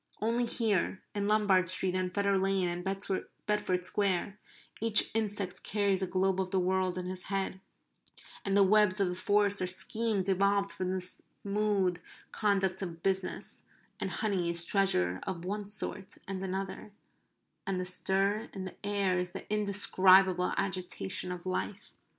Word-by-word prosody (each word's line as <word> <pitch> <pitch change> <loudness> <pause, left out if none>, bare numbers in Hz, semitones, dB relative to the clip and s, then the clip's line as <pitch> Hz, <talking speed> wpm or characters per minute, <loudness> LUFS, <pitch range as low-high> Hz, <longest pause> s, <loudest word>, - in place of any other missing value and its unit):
Only 235 +3 +1
here 215 -5 +1
in 205 -1 -1
Lombard 200 -4 +3
Street 185 0 +1
and 185 -1 -1
Fetter 200 +1 +1
Lane 195 -1 +1
and 175 0 -4
Bedford 195 -1 -2
Square 200 +1 -1 0.4
each 225 -2 +5
insect 205 -4 -2
carries 200 -2 0
a 190 - -1
globe 190 +1 +1
of 185 - -3
the 190 0 +1
world 185 0 0
in 180 - -4
his 185 0 -4
head, 195 -1 -3 0.8
and 195 0 +1
the 200 - +7
webs 210 0 +4
of 195 -2 +2
the 180 - -3
forest 205 +1 +2
are 185 - 0
schemes 205 +2 0
evolved 200 +1 +2
for 185 - -4
the 185 +1 -1
smooth 200 0 -1 0.3
conduct 195 -3 0
of 170 -3 -6
business; 190 -1 -2 0.4
and - - -2
honey 195 -6 -1
is 170 0 +6
treasure 95 - +3
of 175 -2 -5
one 205 +2 -3
sort 205 -1 -1
and 190 -1 -4
another; 195 +2 -5 0.7
and 190 -2 -1
the 185 - -3
stir 195 +3 0
in 190 -1 -5
the 185 - -10
air 200 -3 0
is 180 0 -4
the - - -8
indescribable 190 -3 +4
agitation 180 - -2
of 180 0 -7
life. 185 +2 -4
190 Hz, 155 wpm, -31 LUFS, 185-205 Hz, 0.8 s, the